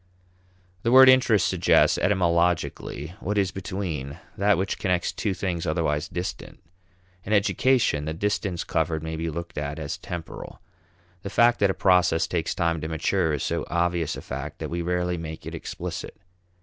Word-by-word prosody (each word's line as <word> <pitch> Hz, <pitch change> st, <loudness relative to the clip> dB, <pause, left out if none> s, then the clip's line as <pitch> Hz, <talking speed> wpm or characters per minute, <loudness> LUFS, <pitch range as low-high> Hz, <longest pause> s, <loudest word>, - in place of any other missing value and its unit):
The 115 Hz, -, 0 dB
word 130 Hz, +1 st, +9 dB
interest 125 Hz, -7 st, +5 dB
suggests, -, -, +3 dB
etymologically, 85 Hz, -4 st, 0 dB
what 105 Hz, +2 st, -2 dB
is 95 Hz, -2 st, +2 dB
between, 85 Hz, -7 st, -4 dB, 0.2 s
that 100 Hz, 0 st, +3 dB
which 95 Hz, +2 st, -2 dB
connects 90 Hz, -2 st, 0 dB
two 100 Hz, -3 st, -2 dB
things 90 Hz, -4 st, -3 dB
otherwise 75 Hz, -1 st, 0 dB
distant. 90 Hz, +2 st, -6 dB, 0.7 s
In 105 Hz, -, -2 dB
education, 105 Hz, -, +2 dB
the 80 Hz, -, -3 dB
distance 100 Hz, -1 st, -1 dB
covered 80 Hz, -1 st, -1 dB
may 80 Hz, 0 st, -4 dB
be 80 Hz, +1 st, -3 dB
looked 85 Hz, 0 st, -5 dB
at 75 Hz, +1 st, -4 dB
as 75 Hz, -3 st, -5 dB
temporal. 85 Hz, -2 st, -7 dB, 0.6 s
The 100 Hz, -, -5 dB
fact 120 Hz, +4 st, +4 dB
that 100 Hz, -, +3 dB
a 95 Hz, -, 0 dB
process 90 Hz, -4 st, +3 dB
takes 85 Hz, 0 st, -2 dB
time 85 Hz, -3 st, 0 dB
to 80 Hz, -, -3 dB
mature 80 Hz, 0 st, 0 dB
is 75 Hz, -, -2 dB
so -, -, -1 dB
obvious 85 Hz, -2 st, 0 dB
a -, -, -8 dB
fact 70 Hz, +4 st, -6 dB
that 80 Hz, -, -6 dB
we 85 Hz, 0 st, -2 dB
rarely 90 Hz, 0 st, -1 dB
make 80 Hz, -1 st, -7 dB
it -, -, -6 dB
explicit. -, -, -6 dB
85 Hz, 165 wpm, -25 LUFS, 80-95 Hz, 0.7 s, word